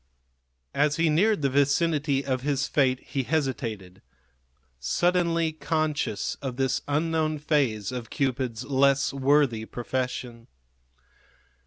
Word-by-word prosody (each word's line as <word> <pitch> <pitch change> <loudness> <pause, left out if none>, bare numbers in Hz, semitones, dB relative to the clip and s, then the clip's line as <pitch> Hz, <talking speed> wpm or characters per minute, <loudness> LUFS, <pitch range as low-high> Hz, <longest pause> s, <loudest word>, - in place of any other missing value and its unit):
As 150 +1 +2
he 165 -1 +2
neared 200 +2 +2
the 140 - +3
vicinity 145 0 +1
of 130 -2 -1
his 140 0 0
fate 130 -3 +1
he 135 - -3
hesitated, 115 - -3 0.8
suddenly 170 - +1
conscious 155 -5 -1
of 130 -3 -4
this 135 -1 0
unknown 155 +1 0
phase 135 -9 0
of 125 -3 -6
Cupid's 130 -4 -2
less 140 0 +2
worthy 135 -4 +2
profession. 120 -1 -4
140 Hz, 110 wpm, -26 LUFS, 125-155 Hz, 0.8 s, the